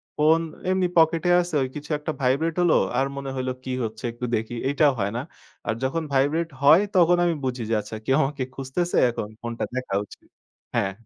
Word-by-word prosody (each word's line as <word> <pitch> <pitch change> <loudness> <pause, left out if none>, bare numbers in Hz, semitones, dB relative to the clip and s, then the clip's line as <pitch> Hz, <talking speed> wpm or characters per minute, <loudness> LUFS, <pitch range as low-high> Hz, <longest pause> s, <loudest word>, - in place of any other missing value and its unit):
Phone 160 +2 +4 0.3
এমনি 185 -1 +2
পকেটে 165 +2 +4
আছে 175 -2 -6
ওই 130 - -1
কিছু 150 +1 -8
একটা 155 +1 -3
ভাইব্রেট 140 +6 +1
হলো। 175 -2 +4 0.2
আর 135 - +3
মনে 140 -1 -4
হইলো 130 0 -2
কি 130 - -5
হচ্ছে 110 +1 -5
একটু 120 +1 -5
দেখি। 110 +2 -3
এইটাও 145 +1 +4
হয় 100 0 0
না। - - -1 0.5
আর - - +1
যখন 160 +5 -1
ভাইব্রেট 150 +5 +2
হয় 155 +6 +7
তখন 175 0 +5
আমি 170 - +2
বুঝি 125 -2 -2
যে - - +1
আচ্ছা 105 +1 -8
কেউ 135 - +3
আমাকে 135 -1 -2
খুঁজতেছে 135 +7 -2
এখন 110 -3 -4
ফোনটা 120 0 -4
দেখা 130 -6 -4
উচিত। - - -16 0.5
হ্যাঁ। 95 - +1
135 Hz, 195 wpm, -24 LUFS, 125-165 Hz, 0.5 s, হয়